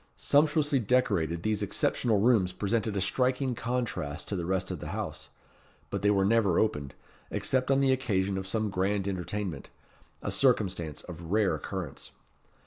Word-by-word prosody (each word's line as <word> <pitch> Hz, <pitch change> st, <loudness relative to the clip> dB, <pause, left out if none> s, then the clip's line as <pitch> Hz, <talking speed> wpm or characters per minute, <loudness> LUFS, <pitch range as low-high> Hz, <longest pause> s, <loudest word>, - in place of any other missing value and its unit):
Sumptuously 150 Hz, -1 st, +3 dB
decorated, 100 Hz, -9 st, +1 dB
these 110 Hz, -1 st, 0 dB
exceptional 105 Hz, +2 st, +1 dB
rooms 105 Hz, -5 st, +3 dB
presented 105 Hz, +2 st, -1 dB
a -, -, 0 dB
striking 125 Hz, +6 st, +1 dB
contrast 115 Hz, -12 st, -3 dB
to 100 Hz, -, -1 dB
the 85 Hz, -2 st, -3 dB
rest 95 Hz, 0 st, -1 dB
of 90 Hz, -, -4 dB
the -, -, -6 dB
house; -, -, -5 dB, 0.6 s
but 100 Hz, -, -2 dB
they 100 Hz, -, +3 dB
were 100 Hz, -2 st, +3 dB
never 105 Hz, -4 st, +3 dB
opened, 75 Hz, -10 st, 0 dB, 0.3 s
except 130 Hz, 0 st, 0 dB
on 135 Hz, 0 st, +4 dB
the 135 Hz, -1 st, +4 dB
occasion 100 Hz, -7 st, 0 dB
of 95 Hz, 0 st, -4 dB
some 110 Hz, +1 st, -1 dB
grand 95 Hz, +1 st, 0 dB
entertainment 95 Hz, -4 st, -4 dB, 0.5 s
a -, -, -2 dB
circumstance 95 Hz, -, +1 dB
of 85 Hz, -2 st, -9 dB
rare 105 Hz, -1 st, +3 dB
occurrence. 90 Hz, -8 st, -5 dB
100 Hz, 155 wpm, -29 LUFS, 95-120 Hz, 0.6 s, on